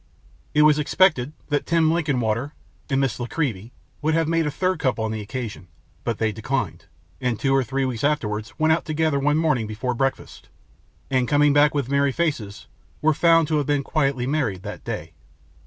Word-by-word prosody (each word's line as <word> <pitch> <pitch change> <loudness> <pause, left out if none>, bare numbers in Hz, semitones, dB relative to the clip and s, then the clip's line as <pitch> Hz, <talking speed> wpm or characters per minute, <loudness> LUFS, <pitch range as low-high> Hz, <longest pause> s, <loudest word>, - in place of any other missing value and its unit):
It 150 - +6
was 150 0 +5
expected 150 -4 +2 0.2
that 145 -1 0
Tim 165 -1 +3
Linkinwater 140 -5 0 0.4
and 135 -1 +1
Miss 135 -4 0
La 120 - -3
Creevy 120 - -3 0.3
would 155 +1 +1
have 165 -1 +1
made 165 -1 +1
a - - +1
third 185 +3 -1
couple 130 -6 0
on 110 - -2
the 110 -1 -3
occasion, 105 -3 -6 0.4
but 115 -3 -2
they 110 -1 0
declined, 110 -6 -3 0.4
and 125 -4 -1
two 135 -1 +1
or 135 - +3
three 135 +3 -1
weeks 120 -4 -3
afterwards 110 -7 -1
went 155 0 +3
out 165 - 0
together 155 -2 0
one 145 +2 +2
morning 150 -9 +1
before 110 +4 -3
breakfast, 135 +2 -3 0.6
and, 130 -2 +2
coming 145 +1 +4
back 145 +1 +4
with 140 -4 0
merry 140 0 +2
faces, 130 -11 -2 0.3
were 155 +1 +3
found 165 0 +4
to 155 - +2
have 145 - -1
been 145 -1 +1
quietly 135 -4 0
married 125 -10 -1
that - - -7
day. - - -5
140 Hz, 190 wpm, -23 LUFS, 120-155 Hz, 0.6 s, It